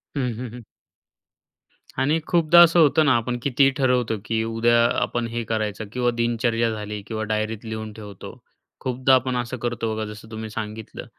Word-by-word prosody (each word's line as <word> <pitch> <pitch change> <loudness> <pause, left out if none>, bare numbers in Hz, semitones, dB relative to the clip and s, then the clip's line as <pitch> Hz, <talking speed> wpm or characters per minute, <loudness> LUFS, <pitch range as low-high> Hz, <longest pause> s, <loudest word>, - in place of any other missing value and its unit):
हं, 140 - 0 0.2
हं, 125 - -4
हं. 120 - -10 1.4
आणि 150 +5 +2
खूपदा 170 0 +5
असं 170 0 +4
होतं 155 0 +5
ना 135 - +4
आपण 120 +1 -2
कितीही 135 0 +4
ठरवतो 125 -4 +1
की 110 0 0
उद्या 115 +1 +2 0.2
आपण 120 -1 -1
हे 115 0 -3
करायचं 110 -1 -2
किंवा 125 -1 +1
दिनचर्या 115 0 0
झाली 105 -1 -5
किंवा 110 -1 -3
डायरीत 110 +1 -2
लिहून 110 -1 -5
ठेवतो. 105 -3 -10 0.4
खूपदा 130 +1 +1
आपण 130 0 0
असं 120 +1 -3
करतो 120 -2 -2
बघा 110 0 -3
जसं 105 +1 -10
तुम्ही 110 0 -6
सांगितलं 110 0 -7
115 Hz, 165 wpm, -23 LUFS, 110-125 Hz, 1.4 s, खूपदा